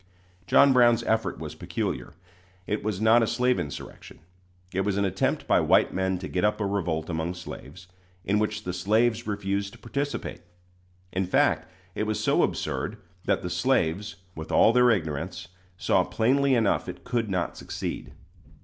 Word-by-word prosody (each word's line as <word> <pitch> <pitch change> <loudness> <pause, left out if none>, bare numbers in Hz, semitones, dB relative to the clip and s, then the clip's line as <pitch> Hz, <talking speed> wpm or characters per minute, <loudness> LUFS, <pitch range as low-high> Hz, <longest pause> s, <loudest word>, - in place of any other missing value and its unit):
John 140 -1 +6
Brown's 120 -2 +5
effort 110 0 0
was - - -6
peculiar. - - -4 0.5
It 105 - -2
was 105 -3 -2
not 110 +2 +5
a 115 - +2
slave 125 -1 +1
insurrection. 75 -5 -7 0.6
It 95 - +1
was 100 0 0
an 100 - +2
attempt 95 0 0
by - - +4
white - - +3
men 95 0 0
to 90 +1 -6
get 90 - -2
up 105 +1 +2
a 105 - 0
revolt 90 -5 -1
among 85 +1 -2
slaves, 90 0 -9 0.4
in 105 +2 +2
which 105 0 -1
the 90 - -3
slaves 110 +5 +1
refused 100 -1 -2
to - - -13
participate. 140 0 -4 0.7
In 95 0 0
fact, - - +2 0.2
it 110 - -2
was 110 - -1
so - - +2
absurd - - -2 0.3
that - - +1
the 90 - -3
slaves, 95 -1 0 0.2
with 80 -1 -7
all 115 - +5
their 125 0 +5
ignorance, 85 -2 -2 0.3
saw - - +2
plainly 135 +4 +2
enough 110 -4 +1
it - - -8
could 120 -3 -1
not 90 -3 -1
succeed. - - -5
100 Hz, 165 wpm, -26 LUFS, 90-115 Hz, 0.7 s, John